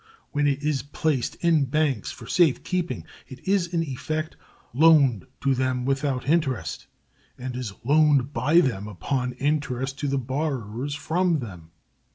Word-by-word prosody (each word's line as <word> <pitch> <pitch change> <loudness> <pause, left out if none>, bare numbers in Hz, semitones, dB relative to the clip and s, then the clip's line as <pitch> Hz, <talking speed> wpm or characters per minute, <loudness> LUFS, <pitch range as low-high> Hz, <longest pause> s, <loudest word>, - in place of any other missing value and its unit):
When 145 0 +1
it 140 0 0
is 150 -3 0
placed 145 -3 -1
in 165 -4 +3
banks 135 -4 0
for 115 - -9
safe 160 +2 +3
keeping, 180 -2 -2 0.2
it 130 +6 -12
is 190 -3 +2
in 170 -1 0
effect 155 +3 -4 0.4
loaned 140 - +5
to 135 -1 +2
them 130 -1 0
without 135 -1 -1
interest, 150 -5 0 0.5
and 125 0 -5
is 125 -5 -4
loaned 145 0 +3
by 150 +9 +4
them 105 - -1
upon 125 - -2
interest 135 -1 -1
to 145 - -1
the 140 0 0
borrowers 130 -1 -3
from 170 +3 +1
them. 90 - -8
140 Hz, 150 wpm, -25 LUFS, 125-155 Hz, 0.5 s, loaned